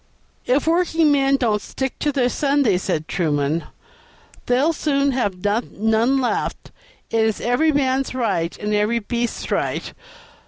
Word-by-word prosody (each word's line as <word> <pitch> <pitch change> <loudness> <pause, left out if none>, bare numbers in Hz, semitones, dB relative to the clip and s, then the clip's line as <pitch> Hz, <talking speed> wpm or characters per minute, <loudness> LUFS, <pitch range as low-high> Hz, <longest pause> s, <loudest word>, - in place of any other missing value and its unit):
"If 260 +3 +2
workingmen 320 -5 +3
don't 220 -5 0
stick 265 -1 -4
to 295 - 0
their 260 -3 +1
Sunday," 275 -7 +1
said 155 -3 -2
Truman, 155 -2 0 0.8
"they'll 265 +7 +2
soon 280 -2 +1
have 205 -8 -2
none 225 +4 +1
left; 250 - -2 0.4
it 225 -1 +2
is 220 -1 0
every 245 +7 +2
man's 270 -2 0
right 195 -9 -1
and 210 0 -3
every 210 +3 +1
beast's 235 +1 -3
right. - - -2
245 Hz, 130 wpm, -21 LUFS, 210-275 Hz, 0.8 s, workingmen